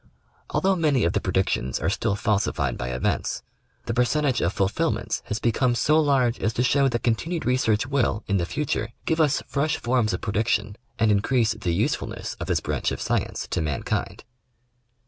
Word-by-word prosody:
Although 195 0 +2
many 150 -6 +2
of 85 - +1
the - - 0
predictions 95 -9 0
are - - -1
still 100 - 0
falsified 105 -1 0
by - - -4
events, 65 0 -1 0.4
the 115 - -2
percentage 125 +2 +1
of 85 - +1
fulfilments 95 0 -1
has 105 - -2
become 120 +2 +1
so 155 +6 +3
large 135 -5 +2
as 110 - 0
to 125 - +1
show 140 +2 +3
that 120 -2 -2
continued 160 +7 -1
research 120 -3 +2
will 130 -5 0
in 100 - +1
the 85 -2 -1
future 115 -5 -2
give 160 0 +1
us 145 -2 +2
fresh 145 +2 0
forms 120 -2 +1
of - - -3
pre 100 - -3
diction 105 -1 0 0.2
and 110 -1 +3
increase 115 +3 +2
the 90 -6 -2
usefulness - - -2
of - - -4
this - - +1
branch - - -1
of - - -4
science - - -1
to - - 0
mankind. 75 -4 -2
115 Hz, 185 wpm, -25 LUFS, 105-140 Hz, 0.4 s, so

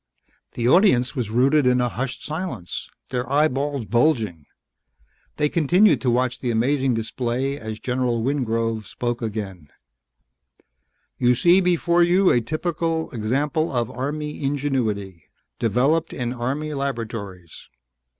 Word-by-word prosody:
The 120 0 -1
audience 130 - +4
was 120 -6 -2
rooted 130 +5 +3
in 125 0 +3
a 125 - +2
hushed 130 +2 -4
silence, 155 - -5 0.2
their 125 0 -3
eyeballs 145 -3 +1
bulging. 110 - +1 0.9
They 150 - +2
continued 170 - +3
to 130 - +1
watch 125 +1 0
the 125 - -2
amazing 130 +2 +1
display 125 +4 -2
as 110 -1 -6
General 125 -2 -1
Wingrove 115 -5 -1
spoke 120 0 -3
again: 100 -8 -5 1.5
"You 125 0 +4
see 175 +8 +5
before 175 -1 +2
you 180 +2 +4
a 120 - +3
typical 160 +4 -2
example 140 +8 -1
of 120 -4 -1
Army 150 +4 -4
ingenuity, 120 - -2 0.3
developed 135 +9 +1
in 120 -1 -3
Army 140 +5 -3
laboratories. 110 - -5
125 Hz, 120 wpm, -23 LUFS, 115-150 Hz, 1.5 s, see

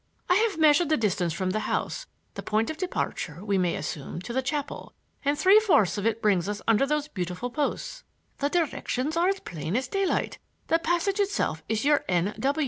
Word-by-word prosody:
I 360 - +4 0.2
have 395 - -8
measured 310 0 +5
the 310 - +3
distance 190 -6 0
from 185 +3 -1
the 215 - 0
house, - - -2 0.3
the - - -6
point 220 +5 0
of 315 - -8
departure, 190 - -3
we 200 -2 +1
may 180 -2 +1
assume, 150 +1 -5
to 235 - -6
the 260 - +1
chapel, 280 +2 -4 0.3
and 285 +1 +1
three 390 +6 +7
fourths 330 - +3
of 205 +1 -1
it 225 0 -1
brings 200 -3 +2
us 205 0 -3
under 225 +4 +4
those 300 0 0
beautiful 185 - -4
posts. - - -3 0.4
The 285 - +1
directions 310 -3 -1
are 340 +2 +3
as 390 0 -1
plain 165 +2 -4
as 255 +1 0
daylight. 390 +5 -1 0.3
The 330 - +4
passage 345 +4 0
itself 395 - 0
is 220 +3 0
your 295 0 +4
N. 180 +3 +1
255 Hz, 200 wpm, -27 LUFS, 200-330 Hz, 0.4 s, three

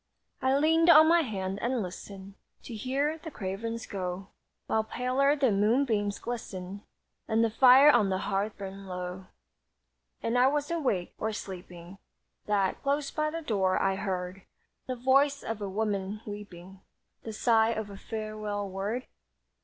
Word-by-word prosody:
I 260 +1 +2
leaned 325 +3 +4
on 315 -1 +9
my 340 +1 +5
hand 195 -7 -3
and 240 -2 0
listened 190 +2 -9 0.3
To 240 - -8
hear 275 +8 -1
the 320 - -8
cravens 225 0 -5
go, 190 0 -5 0.4
While 220 - +1
paler 255 +5 +1
the 270 -5 +2
moonbeams 210 0 +1
glistened 200 -5 -6 0.5
And 225 +1 +2
the 225 - +1
fire 260 +5 +8
on 215 -7 +3
the 190 - 0
hearth 200 +2 -2
burned 195 0 -8
low. 180 0 -6 1.0
And 230 - -1
was 275 +5 +2
I - - +1
awake, 205 - -1
or 220 - -1
sleeping, 180 -2 -9 0.5
That, 200 -2 0
close 280 0 -1
by 305 0 0
the 330 +1 -5
door, 190 -7 +1
I 195 0 +2
heard 190 -1 -4 0.5
The 255 - -2
voice 275 +3 +2
of 225 -1 -4
a 200 - -3
woman 205 0 -2
weeping 195 -3 -9 0.4
The 225 - -7
sigh 225 0 +3
of 220 -3 -3
a - - -8
farewell 215 -1 -4
word? 200 +6 -3
215 Hz, 155 wpm, -29 LUFS, 195-255 Hz, 1.0 s, on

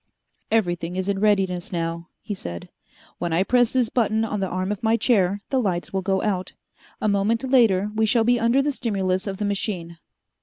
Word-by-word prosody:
"Everything 175 -5 0
is 185 0 -2
in 200 -1 0
readiness 195 -4 +1
now," 170 -1 -3
he 210 - -5
said. 85 - -7 0.5
"When 175 - -2
I 170 +3 +2
press 245 +2 +3
this 250 -4 +1
button 220 -2 +1
on 210 -2 -3
the 190 - -1
arm 185 +2 -2
of 210 - -4
my 225 0 +2
chair, 200 -5 +2
the 265 -2 +2
lights 180 -5 -2
will 190 - 0
go 190 0 0
out. 190 -3 -2 0.5
A - - 0
moment 210 +4 +1
later 225 -7 +3
we 220 0 +1
shall 230 +1 +3
be 245 +1 +3
under 235 +4 +3
the 295 - +1
stimulus 195 -6 -1
of 195 -1 -3
the 210 - -2
machine. 185 -5 -3
200 Hz, 200 wpm, -23 LUFS, 185-225 Hz, 0.5 s, press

